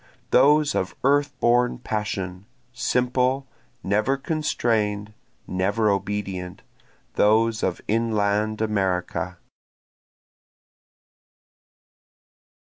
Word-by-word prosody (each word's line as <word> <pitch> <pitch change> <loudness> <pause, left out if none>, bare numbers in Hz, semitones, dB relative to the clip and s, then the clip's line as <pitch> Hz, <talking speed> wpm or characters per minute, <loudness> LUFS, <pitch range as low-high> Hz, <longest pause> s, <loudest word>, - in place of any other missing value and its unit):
Those 145 +3 +5
of 95 0 -2
earth 145 +2 +2
born 120 +1 +3
passion, 100 -4 -4 0.3
simple, 125 +1 0 0.4
never 105 +7 +1
constrain'd, 110 -9 -1 0.3
never 100 +4 +1
obedient, 95 -2 -3 0.5
Those 110 +2 +3
of 90 - -1
inland 110 -1 0
America. 95 -3 -1
110 Hz, 65 wpm, -24 LUFS, 100-125 Hz, 0.5 s, Those